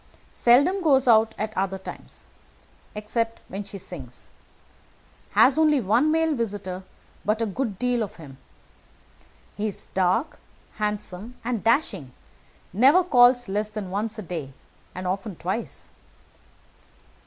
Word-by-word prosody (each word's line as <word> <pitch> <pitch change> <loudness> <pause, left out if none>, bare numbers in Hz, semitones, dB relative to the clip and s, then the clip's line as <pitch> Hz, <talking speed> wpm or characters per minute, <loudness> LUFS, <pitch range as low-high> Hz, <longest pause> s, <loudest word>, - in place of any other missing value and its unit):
Seldom 285 +11 +4
goes 270 -6 +3
out 220 -1 +5
at 215 +1 -4
other 195 0 -1
times, 190 - -10 0.7
except 225 +2 -2
when 195 +2 -5
she 200 0 -9
sings. 150 -10 -9 1.0
Has 275 +4 +5
only 305 -2 +4
one 240 +8 +2
male 320 0 +2
visitor, 200 -7 -3 0.4
but 215 +2 0
a 230 - +1
good 215 -1 -3
deal 245 0 0
of 210 - -4
him. 140 -5 -12 1.2
He 210 +1 -2
is 205 - -5
dark, 190 - +1 0.4
handsome, 210 +1 -4
and 235 -2 -2
dashing; 220 - +1 0.6
never 275 - +6
calls 245 -6 +5
less 210 +2 -1
than 210 -3 -6
once 215 +3 -2
a 215 - -5
day, 160 -6 -6 0.4
and 185 +1 -5
often 195 +2 -3
twice. 190 +8 -5
215 Hz, 130 wpm, -25 LUFS, 190-245 Hz, 1.2 s, never